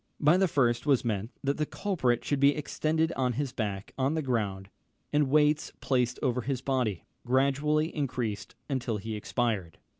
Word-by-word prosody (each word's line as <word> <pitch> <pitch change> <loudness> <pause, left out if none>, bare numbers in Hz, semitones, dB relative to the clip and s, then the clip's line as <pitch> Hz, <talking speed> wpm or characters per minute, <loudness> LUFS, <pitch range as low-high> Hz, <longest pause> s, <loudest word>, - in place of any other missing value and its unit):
By 150 +3 +5
the 190 +1 +3
first 125 -4 +1
was 135 -4 +3
meant, 110 -1 -1
that 140 +1 0
the 155 - 0
culprit 130 - 0
should 145 - 0
be 140 +1 +5
extended 160 +2 0
on 125 -2 0
his 135 +1 -2
back 105 -6 -4
on 135 +4 +1
the 160 - -1
ground, 100 -6 -2 0.4
and 145 -2 +3
weights 150 +1 +3
placed 125 -2 +1
over 125 -2 +1
his 130 +1 -2
body, 125 -8 -1 0.2
gradually 140 +5 +1
increased, 125 -8 -3
until 125 -5 -1
he 110 +2 -5
expired. 105 - -2
130 Hz, 170 wpm, -29 LUFS, 115-145 Hz, 0.4 s, By